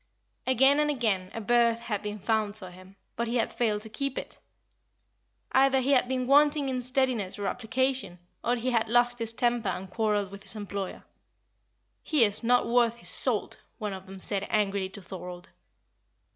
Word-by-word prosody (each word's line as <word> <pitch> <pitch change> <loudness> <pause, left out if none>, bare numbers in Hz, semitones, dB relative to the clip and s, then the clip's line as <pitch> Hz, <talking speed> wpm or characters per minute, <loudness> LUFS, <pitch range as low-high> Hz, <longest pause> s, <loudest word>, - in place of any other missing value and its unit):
Again 270 +3 +5
and 300 0 +2
again 215 -10 0
a - - -5
berth 235 +1 +2
had 215 -4 -3
been 210 0 -5
found 210 0 -1
for 185 -4 -10
him, 185 +2 -15 0.2
but 235 +1 -2
he 235 - -2
had 235 - 0
failed 215 -3 0
to 220 - -9
keep 275 +3 -3
it. - - -6 1.1
Either 270 0 +4
he 260 +2 0
had 255 -2 +4
been 255 0 -1
wanting 290 +1 +4
in 255 -1 -2
steadiness 250 -6 0
or 205 - -4
application, 250 -3 -1 0.3
or 245 - +2
he 245 +2 -2
had 225 -2 +1
lost 240 +1 +3
his 230 -1 -2
temper 240 -2 0
and 185 0 -5
quarrelled 210 -2 0
with 200 0 -10
his 195 +1 -3
employer. 200 -2 -5 1.0
"He 300 -6 +3
is 205 -1 -1
not 245 +1 +3
worth 235 -1 +2
his - - -2
salt!" - - +2 0.2
one 210 -3 -4
of 190 0 -9
them 190 0 -10
said 200 +1 -2
angrily 200 -2 0
to 200 0 -10
Thorold. 180 -1 -9
225 Hz, 185 wpm, -28 LUFS, 200-250 Hz, 1.1 s, Again